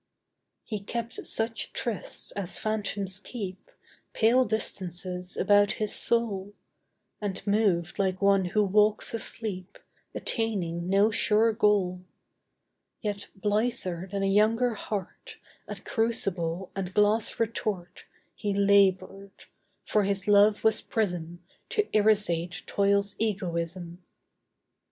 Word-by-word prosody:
He 215 Hz, -3 st, -4 dB
kept 235 Hz, +4 st, -5 dB
such 225 Hz, 0 st, 0 dB
trysts 230 Hz, -5 st, -3 dB
as 190 Hz, -3 st, -4 dB
phantoms 200 Hz, -3 st, -2 dB
keep, 200 Hz, -4 st, -7 dB, 0.4 s
Pale 245 Hz, +3 st, +4 dB
distances 180 Hz, -4 st, -3 dB
about 205 Hz, 0 st, +4 dB
his 215 Hz, -1 st, -2 dB
soul; 205 Hz, -4 st, 0 dB, 0.7 s
And 200 Hz, -2 st, -4 dB
moved 200 Hz, -4 st, +1 dB
like 190 Hz, -1 st, 0 dB
one 200 Hz, -1 st, +3 dB
who 210 Hz, +4 st, +1 dB
walks 210 Hz, +3 st, +2 dB
asleep, 210 Hz, -5 st, -4 dB, 0.4 s
Attaining 180 Hz, -7 st, -1 dB
no 200 Hz, +3 st, +4 dB
sure 220 Hz, +1 st, +3 dB
goal: 200 Hz, -5 st, +2 dB, 1.0 s
Yet 205 Hz, -2 st, -4 dB
blither 205 Hz, -3 st, -1 dB
than 200 Hz, -1 st, -2 dB
a -, -, +2 dB
younger 220 Hz, +5 st, +3 dB
heart 205 Hz, -2 st, -6 dB, 0.3 s
At -, -, -8 dB
crucible 190 Hz, -6 st, 0 dB
and 190 Hz, -1 st, -4 dB
glass 210 Hz, +1 st, +2 dB
retort 205 Hz, -5 st, -3 dB, 0.3 s
He 205 Hz, -1 st, -3 dB
labored; 195 Hz, -1 st, +2 dB, 0.4 s
for 210 Hz, -, +2 dB
his 200 Hz, 0 st, -1 dB
love 205 Hz, +1 st, +5 dB
was 220 Hz, -1 st, +4 dB
prism 175 Hz, -5 st, -3 dB, 0.3 s
To 420 Hz, -, +1 dB
irisate 180 Hz, -5 st, +2 dB
toil's 200 Hz, 0 st, +1 dB
egoism. 175 Hz, -4 st, -3 dB
200 Hz, 110 wpm, -27 LUFS, 185-215 Hz, 1.0 s, love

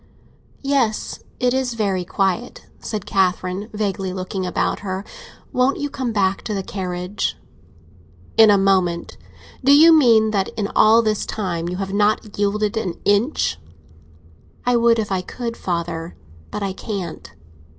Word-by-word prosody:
"Yes, 270 Hz, -6 st, 0 dB, 0.2 s
it's 250 Hz, 0 st, +1 dB
very 195 Hz, -5 st, 0 dB
quiet," 195 Hz, +6 st, -2 dB
said 210 Hz, -3 st, -5 dB
Catherine 190 Hz, +1 st, 0 dB
vaguely, 195 Hz, -3 st, -2 dB
looking 185 Hz, 0 st, -4 dB
about -, -, -1 dB
her. 190 Hz, 0 st, -4 dB, 0.5 s
"Won't 255 Hz, +2 st, +2 dB
you 290 Hz, -1 st, -3 dB
come 255 Hz, -3 st, -2 dB
back 195 Hz, -3 st, +1 dB
to 215 Hz, -, -2 dB
the 195 Hz, -, -2 dB
carriage?" 185 Hz, 0 st, -3 dB, 1.0 s
"In 220 Hz, -1 st, +7 dB
a 205 Hz, -, +6 dB
moment. 185 Hz, -3 st, +1 dB, 0.5 s
Do 270 Hz, -, +5 dB
you 320 Hz, +3 st, +8 dB
mean 230 Hz, -8 st, +5 dB
that 195 Hz, -2 st, 0 dB
in 205 Hz, -2 st, -1 dB
all 225 Hz, +2 st, +6 dB
this 215 Hz, -1 st, 0 dB
time 175 Hz, -5 st, -3 dB
you 180 Hz, -, -4 dB
have 195 Hz, 0 st, -4 dB
not 210 Hz, +1 st, +1 dB
yielded 205 Hz, +1 st, 0 dB
an 185 Hz, -6 st, -2 dB
inch?" 205 Hz, -, +1 dB, 1.1 s
"I 245 Hz, 0 st, +3 dB
would 235 Hz, 0 st, +4 dB
if 215 Hz, -2 st, -2 dB
I 190 Hz, -1 st, 0 dB
could, 230 Hz, +5 st, -5 dB
father; 170 Hz, -3 st, -4 dB, 0.3 s
but 210 Hz, -, -4 dB
I 195 Hz, -1 st, -2 dB
can't." 190 Hz, -4 st, -6 dB
205 Hz, 145 wpm, -21 LUFS, 185-230 Hz, 1.1 s, you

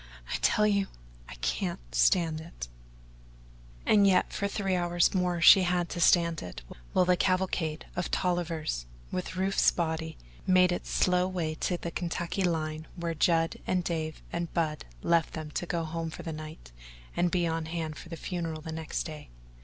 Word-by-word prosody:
"I -, -, +1 dB
tell 210 Hz, -, +4 dB
you 200 Hz, -2 st, +2 dB, 0.4 s
I 65 Hz, -, -8 dB
can't -, -, -2 dB
stand 155 Hz, -, +3 dB
it." 160 Hz, -, -8 dB, 1.2 s
And 205 Hz, -2 st, +5 dB
yet 185 Hz, -2 st, +3 dB
for 200 Hz, -, -1 dB
three 195 Hz, -2 st, -1 dB
hours 175 Hz, -1 st, +2 dB
more 180 Hz, -2 st, 0 dB
she 190 Hz, +3 st, +9 dB
had 175 Hz, -1 st, +1 dB
to -, -, -4 dB
stand 170 Hz, -2 st, +4 dB
it, -, -, -8 dB, 0.3 s
while 180 Hz, -, +3 dB
the 180 Hz, 0 st, +4 dB
cavalcade 185 Hz, -4 st, 0 dB
of 175 Hz, -, -2 dB
Tollivers, 165 Hz, -, -1 dB, 0.2 s
with 185 Hz, 0 st, -3 dB
Rufe's 190 Hz, +1 st, +3 dB
body, 160 Hz, -1 st, -2 dB, 0.3 s
made 185 Hz, -1 st, +5 dB
its 175 Hz, -, -3 dB
slow 180 Hz, 0 st, +2 dB
way 175 Hz, -4 st, -2 dB
to 175 Hz, +2 st, -1 dB
the 170 Hz, -, -5 dB
Kentucky 175 Hz, +2 st, -2 dB
line 155 Hz, -2 st, -1 dB
where 170 Hz, -2 st, -2 dB
Judd 165 Hz, +1 st, +2 dB
and 185 Hz, -1 st, +1 dB
Dave 160 Hz, -2 st, -3 dB
and 170 Hz, -1 st, -2 dB
Bub 155 Hz, -3 st, 0 dB, 0.2 s
left 170 Hz, -2 st, +2 dB
them 155 Hz, -1 st, -6 dB
to 175 Hz, -, -3 dB
go 170 Hz, -1 st, -1 dB
home 165 Hz, +1 st, -3 dB
for 160 Hz, -, -8 dB
the 165 Hz, -, -4 dB
night 155 Hz, -, -9 dB, 0.4 s
and 175 Hz, -, +2 dB
be 175 Hz, -1 st, +1 dB
on 165 Hz, -1 st, -1 dB
hand 160 Hz, -2 st, -3 dB
for 165 Hz, -, -11 dB
the 165 Hz, -, -6 dB
funeral 165 Hz, -4 st, -4 dB
next 160 Hz, 0 st, -3 dB
day. 155 Hz, -2 st, -8 dB
170 Hz, 175 wpm, -29 LUFS, 160-180 Hz, 1.2 s, she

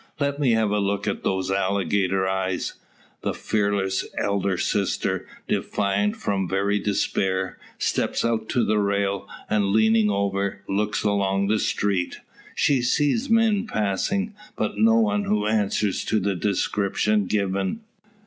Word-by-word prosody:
"Let 140 Hz, 0 st, -1 dB
me 130 Hz, -5 st, +3 dB
have 110 Hz, -2 st, +2 dB
a 105 Hz, -, +1 dB
look 100 Hz, +1 st, -1 dB
at 100 Hz, -, -1 dB
those 95 Hz, 0 st, -1 dB
alligator 95 Hz, 0 st, +1 dB
eyes." 95 Hz, -1 st, -1 dB, 0.5 s
The -, -, -2 dB
fearless 100 Hz, -3 st, 0 dB
elder 100 Hz, -2 st, 0 dB
sister, 100 Hz, +1 st, -1 dB, 0.2 s
defiant 100 Hz, 0 st, 0 dB
from 95 Hz, -3 st, -2 dB
very 100 Hz, +2 st, +1 dB
despair, 95 Hz, -2 st, -1 dB, 0.2 s
steps -, -, 0 dB
out 110 Hz, -1 st, -1 dB
to 120 Hz, -, +2 dB
the 105 Hz, 0 st, +2 dB
rail, 100 Hz, -1 st, 0 dB, 0.2 s
and 105 Hz, -2 st, +1 dB
leaning 110 Hz, +1 st, +4 dB
over, 100 Hz, -1 st, -1 dB
looks 105 Hz, +2 st, -1 dB
along 100 Hz, -1 st, +1 dB
the 110 Hz, 0 st, +2 dB
street. 100 Hz, -4 st, -1 dB, 0.4 s
She 135 Hz, -3 st, +2 dB
sees 145 Hz, -, +1 dB
men 225 Hz, -1 st, +3 dB
passing; 195 Hz, -, -1 dB, 0.2 s
but -, -, -2 dB
no 225 Hz, +1 st, +5 dB
one 210 Hz, -2 st, +2 dB
who 105 Hz, -, +1 dB
answers 105 Hz, -2 st, 0 dB
to 110 Hz, -, +1 dB
the 100 Hz, 0 st, 0 dB
description 100 Hz, +2 st, 0 dB
given. 100 Hz, -, -1 dB
100 Hz, 140 wpm, -24 LUFS, 95-110 Hz, 0.5 s, no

